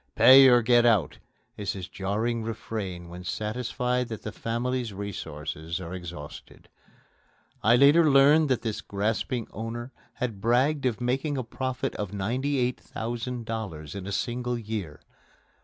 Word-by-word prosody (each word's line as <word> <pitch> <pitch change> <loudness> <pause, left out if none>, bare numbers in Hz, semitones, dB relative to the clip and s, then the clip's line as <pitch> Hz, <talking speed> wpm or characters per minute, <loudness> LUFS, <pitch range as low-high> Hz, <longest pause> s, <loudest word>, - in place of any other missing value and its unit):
"Pay 135 +1 +9
or 120 -2 +6
get 120 +1 +5
out!" 110 - +2 0.4
is 105 -2 -2
his 95 -2 -6
jarring 110 +5 -2
refrain 105 -5 -5
when 90 +1 -9
satisfied 125 +5 -2
that 110 -3 -7
the 110 - -4
family's 120 +2 -2
resources 80 -5 -5
are 90 -1 -7
exhausted. 85 -5 -9 0.9
I 115 +3 +5
later 145 +5 +6
learned 145 +2 +6
that 130 - +1
this 110 -3 -3
grasping 110 +4 -2
owner 115 +4 -6 0.2
had 115 -6 -4
bragged 130 +5 +2
of 120 -1 -2
making 135 +4 -1
a 130 - -1
profit 130 +3 -3
of 105 -2 -3
$98,000 115 - -3
in 95 -1 -6
a - - -4
single 120 +4 -2
year. 105 -9 -5
115 Hz, 135 wpm, -27 LUFS, 100-125 Hz, 0.9 s, Pay